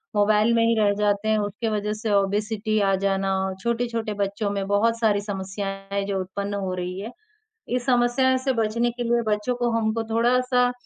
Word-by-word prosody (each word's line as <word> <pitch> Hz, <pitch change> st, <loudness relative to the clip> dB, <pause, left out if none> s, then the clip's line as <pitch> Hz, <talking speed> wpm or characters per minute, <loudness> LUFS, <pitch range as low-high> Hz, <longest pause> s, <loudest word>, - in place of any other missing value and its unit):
Mobile 210 Hz, +2 st, +3 dB
में 230 Hz, 0 st, +3 dB
ही 230 Hz, 0 st, +3 dB
रह 205 Hz, -1 st, +4 dB
जाते 205 Hz, +1 st, 0 dB
हैं 220 Hz, -, +3 dB
उसके 205 Hz, +2 st, -2 dB
वजह 210 Hz, 0 st, -1 dB
से 225 Hz, -2 st, -1 dB
ओबेसिटी 210 Hz, +2 st, 0 dB
आ 195 Hz, -1 st, +2 dB
जाना 195 Hz, 0 st, +1 dB
और 190 Hz, 0 st, -3 dB
छोटे-छोटे 235 Hz, -2 st, -1 dB
बच्चों 200 Hz, +1 st, -2 dB
में 200 Hz, -1 st, -2 dB
बहुत 225 Hz, +3 st, +2 dB
सारी 210 Hz, -3 st, +2 dB
समस्याएँ 195 Hz, 0 st, -5 dB
हैं, 200 Hz, 0 st, 0 dB
जो 195 Hz, -1 st, -2 dB
उत्पन्न 200 Hz, +2 st, -4 dB
हो 190 Hz, -2 st, -2 dB
रही 180 Hz, +1 st, -4 dB
हैं। 215 Hz, +4 st, -6 dB, 0.6 s
इस 250 Hz, -1 st, -2 dB
समस्याओं 250 Hz, +1 st, +3 dB
से 260 Hz, +1 st, 0 dB
बचने 230 Hz, +1 st, +1 dB
के 240 Hz, +1 st, -5 dB
लिए 235 Hz, 0 st, +2 dB
बच्चों 210 Hz, +3 st, 0 dB
को 240 Hz, 0 st, 0 dB
हमको 225 Hz, +1 st, 0 dB
थोड़ा-सा 245 Hz, +2 st, +2 dB
215 Hz, 195 wpm, -24 LUFS, 200-235 Hz, 0.6 s, रह